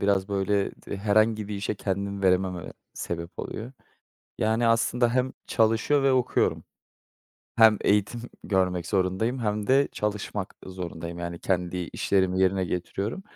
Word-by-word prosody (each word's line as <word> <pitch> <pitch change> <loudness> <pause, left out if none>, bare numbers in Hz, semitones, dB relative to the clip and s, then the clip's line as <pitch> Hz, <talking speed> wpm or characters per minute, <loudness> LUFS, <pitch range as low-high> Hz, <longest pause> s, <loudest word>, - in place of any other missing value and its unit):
biraz 100 -1 +1
böyle 100 0 +1 0.3
herhangi 110 +1 +2
bir 105 - -3
işe 100 +1 -2
kendimi 100 0 -3
veremememe 90 -2 +1 0.2
sebep 85 0 -4
oluyor. 115 +4 -5 0.7
Yani, 110 +2 +2
aslında 115 +1 +3
hem 130 +1 +1 0.2
çalışıyor 115 +5 +2
ve 135 - +4
okuyorum. 125 -1 +1 0.9
Hem 110 -2 +7
eğitim 105 +3 +1 0.2
görmek 90 -3 +1
zorundayım 95 +7 0
hem 105 -3 -1
de 135 +2 +4
çalışmak 105 -2 -3
zorundayım. 85 -2 -6
Yani, 85 0 -5
kendi 90 -1 -1
işlerimi 95 +1 0
yerine 95 0 +3
getiriyorum 100 - -3
100 Hz, 125 wpm, -26 LUFS, 95-110 Hz, 0.9 s, Hem